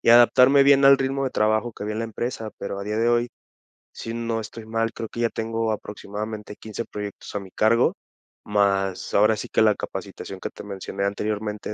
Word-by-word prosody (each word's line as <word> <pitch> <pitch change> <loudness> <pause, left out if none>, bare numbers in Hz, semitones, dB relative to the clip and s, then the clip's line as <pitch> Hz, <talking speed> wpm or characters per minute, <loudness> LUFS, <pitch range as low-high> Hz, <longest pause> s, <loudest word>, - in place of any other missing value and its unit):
y - - +4
adaptarme 125 +3 +7
bien 140 0 +6
al 135 0 +9
ritmo 135 +1 -1
de 130 - -1
trabajo 110 +2 +1
que - - -9
había 105 +1 -3
en 110 - -3
la 115 - -1
empresa, 115 0 -4
pero 100 0 -5
a 100 - -5
día 105 +1 -2
de 115 +1 +3
hoy, 120 0 +2 0.6
sí, 115 - -6
no 115 -1 -2
estoy 110 +1 -8
mal, 115 0 -1
creo 115 - -6
que 120 - -5
ya 115 - +2
tengo 115 0 -2
aproximadamente 105 0 -6
15 110 +1 -6
proyectos 105 -1 -7
a 105 - -1
mi 95 -1 -10
cargo, 115 +5 +3 0.5
más 100 -2 0
ahora 105 +2 +5
sí 105 - -6
que - - +4
la 110 -1 +5
capacitación 95 0 -7
que - - -5
te - - -10
mencioné 100 0 -4
anteriormente 105 +1 -3
110 Hz, 210 wpm, -24 LUFS, 105-115 Hz, 0.6 s, al